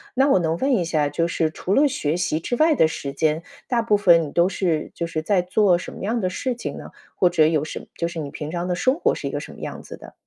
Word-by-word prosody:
那 270 +2 +4
我 270 - +4
能 165 -1 0
问 270 +8 +1
一 185 - +1
下， 155 -3 0
就 145 +4 -1
是 160 -1 0
除 180 +4 -3
了 285 +6 +5
学 155 - -1
习 170 -3 -1
之 245 - -2
外 315 +2 +4
的 160 - +4
时 140 -3 -5
间， 155 +2 0 0.3
大 240 -2 +2
部 220 -2 +2
分 175 -5 +5
你 - - -9
都 175 +2 +3
是 175 -4 -1
就 170 - -3
是 155 -1 -3
在 185 +3 +2
做 180 0 +3
什 - - -8
么 - - -10
样 225 +4 -1
的 185 -4 0
事 250 +7 -2
情 235 - -6
呢？ - - -9 0.3
或 180 - +3
者 160 -3 +4
有 155 -2 +1
什 155 - -7
就 170 - -2
是 170 - -6
你 145 -2 -4
平 150 +2 -6
常 175 +1 -3
的 180 - 0
生 260 +9 +2
活 - - +2
是 - - -4
一 - - -7
个 - - -3
什 - - -9
么 - - -13
样 - - -6
子 - - -10
的？ - - -14
175 Hz, 315 characters per minute, -22 LUFS, 160-210 Hz, 0.3 s, 了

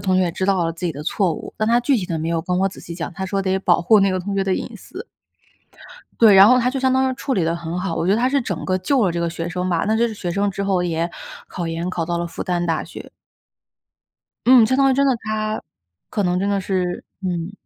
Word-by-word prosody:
同 185 -1 +1
学 185 - +3
也 175 -2 -1
知 185 - -2
道 190 -3 +2
了 165 - -1
自 170 +2 -4
己 - - -1
的 145 +1 -7
错 180 +2 0
误， - - -9
但 215 +1 0
她 235 - +4
具 265 +2 +2
体 185 -6 -3
地 165 -4 -3
没 160 - -3
有 165 -1 0
跟 180 +2 -2
我 195 - +2
仔 - - -12
细 170 - -8
讲， 170 +1 -5
她 190 +2 -5
说 195 +1 -1
得 190 0 0
保 180 -2 +2
护 215 +4 +5
那 195 0 +3
个 185 - -1
同 200 +2 -4
学 195 - +1
的 190 -1 0
隐 235 - -5
私。 370 - -10 1.1
对， 220 -3 +7
然 195 +1 +9
后 250 +1 +6
她 250 0 +1
就 270 - -3
相 260 0 +2
当 260 0 +2
于 - - -3
处 265 +1 -3
理 185 - +1
得 165 +1 0
很 170 +1 -5
好， 180 -2 -2
我 165 - -2
觉 195 - +3
得 215 - +2
她 250 - +2
是 280 +1 +1
整 235 - -4
个 185 - 0
救 245 +6 +1
了 185 - +2
这 170 - -3
个 170 - 0
学 165 0 -5
生 180 +1 -3
吧， 170 -2 0
那 220 - +2
这 235 +1 +2
个 225 - -5
学 180 -4 -4
生 200 +3 0
之 200 +1 -4
后 190 -2 +1
也 170 -1 -1 0.4
考 175 -2 -5
研 165 +2 -3
考 175 -2 -2
到 170 +1 -2
了 170 - -2
复 170 - -6
旦 175 -1 -1
大 165 -2 -1
学。 - - -10 1.4
嗯， 245 -3 +7
相 260 - +1
当 270 0 +4
于 - - +2
真 280 +1 +2
的 260 - +2
她 215 0 -2 0.5
可 205 - -1
能 180 0 +1
真 195 +2 -1
的 200 -1 0
是 185 -2 -2 0.2
嗯。 180 -1 -3
190 Hz, 315 characters per minute, -21 LUFS, 175-220 Hz, 1.4 s, 然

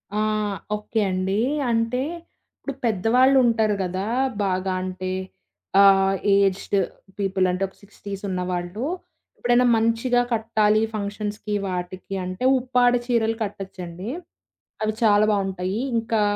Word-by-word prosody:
ఆ! - - +1 0.6
ఓకే 210 +1 -2
అండి. 190 +2 0 0.3
అంటే, 230 +2 +1 0.6
ఇప్పుడు 280 - -5
పెద్దవాళ్ళుంటారు 230 +1 +3
కదా 185 +2 -3 0.4
బాగా 185 0 0
అంటే, 185 0 -4 0.7
ఆహ్, 195 0 +5 0.2
ఏజ్డ్ 200 0 +1 0.4
పీపుల్ 195 -1 +1
అంటే, 180 +2 -2
ఒక 190 - -20
60స్ 200 -1 -9
ఉన్నవాళ్ళు 180 +4 -3 0.5
ఎప్పుడైనా 240 +1 +3
మంచిగా 230 +2 +2
కట్టాలి 220 -1 +2
ఫంక్షన్స్‌కి 210 0 -3
వాటికి 185 +1 -5
అంటే, 185 +6 -5 0.2
ఉప్పాడ 245 -1 +3
చీరలు 225 -2 +1
కట్టొచ్చండి. 190 -1 -6 0.7
అవి 215 0 0
చాలా 210 -1 +5
బావుంటాయి. 195 0 -1 0.2
ఇంకా 225 -1 0
205 Hz, 105 wpm, -23 LUFS, 185-225 Hz, 0.7 s, ఆహ్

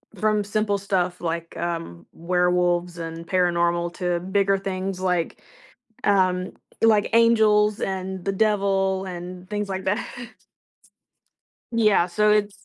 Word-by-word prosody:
from 210 +1 +1
simple 205 0 0
stuff 185 -3 -1
like, 170 0 -4
um, 165 - -4
werewolves 180 0 +1
and 165 0 -7
paranormal 170 -1 +1
to 180 -2 -1
bigger 195 +2 +1
things 190 -1 -4
like 180 -3 -1 0.6
um, 185 -2 +2 0.3
like 215 -2 +4
angels 215 -2 +4
and 190 -1 -3
the 195 - +1
devil 195 -2 +1
and 180 0 -8
things 210 -1 -3
like 190 0 -4
that. 205 +2 0 1.7
Yeah, 215 -6 +3
so 210 +4 +2
it's 210 -1 +2
190 Hz, 120 wpm, -23 LUFS, 175-205 Hz, 1.7 s, like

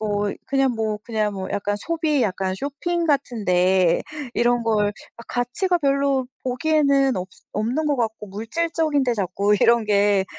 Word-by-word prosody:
뭐 205 -1 -1
그냥 270 -1 +2
뭐, 220 -1 -1
그냥 215 -3 -1
뭐 190 -1 -5
약간 205 0 -1
소비 315 +2 0
약간 190 -2 -1
쇼핑 315 - -2
같은 270 -7 0
데 180 -1 +3 0.3
이런 240 0 +2
걸 215 -2 +2 0.3
막 235 - -12
가치가 245 +10 0
별로 275 -3 +1 0.2
보기에는 275 0 +2
없스 185 0 -7
없는 240 +9 -1
것 290 - +1
같고 225 -3 -2
물질적인 305 - -1
데 250 -2 +1
자꾸 200 +1 +1
이런 235 +2 +4
게 205 -2 +3
235 Hz, 275 characters per minute, -22 LUFS, 205-280 Hz, 0.3 s, 이런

